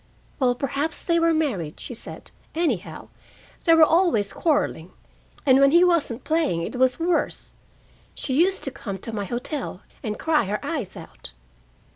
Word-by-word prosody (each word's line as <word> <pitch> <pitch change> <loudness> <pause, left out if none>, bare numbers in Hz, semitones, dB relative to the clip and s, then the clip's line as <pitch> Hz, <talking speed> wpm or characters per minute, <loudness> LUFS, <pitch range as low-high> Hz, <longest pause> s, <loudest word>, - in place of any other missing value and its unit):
"Well, 250 -2 +3
perhaps 280 +4 -2
they 335 -1 +3
were 335 0 +3
married," 240 - -1
she - - -7
said. 225 - -10 0.2
"Anyhow, 300 - -2 0.6
they 330 -2 +6
were 325 - +7
always 320 - +3
quarreling. 285 - 0 0.5
And 265 -1 +6
when 275 0 +6
he 340 +4 +6
wasn't 325 -9 +1
playing, 310 - 0
it - - -5
was 255 +2 +2
worse. 335 0 -1 0.6
She 265 - -3
used 365 +7 +2
to 270 - -3
come 200 -6 -6
to 225 +4 -7
my 205 -2 -2
hotel, 240 - -4 0.2
and 210 -1 -4
cry 310 -6 +2
her 205 +2 -2
eyes 280 - -4
out." - - -11
275 Hz, 160 wpm, -24 LUFS, 220-325 Hz, 0.6 s, were